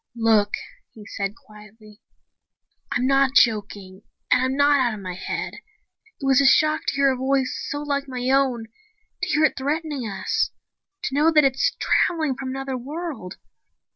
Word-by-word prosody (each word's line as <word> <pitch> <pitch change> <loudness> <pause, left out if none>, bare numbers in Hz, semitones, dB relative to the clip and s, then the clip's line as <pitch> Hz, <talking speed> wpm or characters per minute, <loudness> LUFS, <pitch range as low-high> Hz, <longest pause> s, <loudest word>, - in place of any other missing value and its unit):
"Look," 220 -3 +2 0.4
he 215 -2 -12
said 200 0 -4
quietly. 210 0 -17 0.9
"I'm 250 - 0
not 270 0 +3
joking 200 -4 +1 0.3
and 255 - +5
I'm 260 +1 0
not 285 0 +4
out 240 -4 +1
of - - -9
my 185 -2 -6
head. 180 - -4 0.7
It 275 - -5
was 270 0 +4
a 275 - +4
shock 310 +2 +3
to - - 0
hear 275 -1 +3
a - - -1
voice 265 0 0
so 290 0 -3
like 280 -1 -2
my 250 -1 -4
own, 265 -4 +1 0.6
to 370 - -2
hear 310 -2 +2
it - - +4
threaten 305 +4 -2
us, 230 - -2 0.5
to - - -3
know 300 +4 +3
that 305 -2 +5
it's 270 0 +1
traveling 315 -5 +1
from 260 0 -6
another 270 0 -4
world. 290 - -6
265 Hz, 170 wpm, -23 LUFS, 220-285 Hz, 0.9 s, and